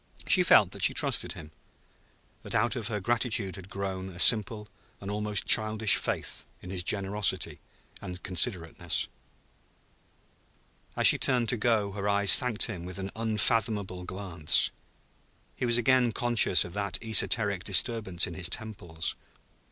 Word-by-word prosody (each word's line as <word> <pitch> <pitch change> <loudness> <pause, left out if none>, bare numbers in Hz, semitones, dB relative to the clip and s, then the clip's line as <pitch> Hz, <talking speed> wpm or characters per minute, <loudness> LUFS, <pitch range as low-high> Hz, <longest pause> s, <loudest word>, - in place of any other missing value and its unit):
He - - +3
felt - - +4
that - - -10
she - - +4
trusted - - 0
him, 75 -1 -12 0.9
that - - -7
out 115 +2 0
of 115 -5 -5
her 105 -2 -3
gratitude 110 -3 -1
had 95 0 -12
grown 95 -1 -6
a 90 - -13
simple 105 +2 +4 0.3
and 100 +1 -7
almost 105 -1 -3
childish 110 -1 +4
faith - - -3 0.2
in 90 - -11
his 95 -2 -3
generosity 100 +2 -1 0.4
and 90 0 -9
considerateness. 90 -2 -2 1.9
As - - 0
she - - +9
turned 125 -3 +1
to 125 - +1
go 105 -3 0
her 100 0 -4
eyes 100 -3 +7
thanked 120 -4 -1
him 95 -7 -4
with 90 +1 -8
an 95 0 -6
unfathomable 105 -3 -2
glance. 90 -4 0 0.8
He 125 - -3
was 120 0 +5
again 120 -1 +2
conscious 120 -6 +2
of 90 - -10
that 100 -2 -4
esoteric 105 -3 0
disturbance 100 -3 +1
in 90 - -8
his 90 0 -2
temples. 90 -7 -5
100 Hz, 145 wpm, -27 LUFS, 95-110 Hz, 1.9 s, she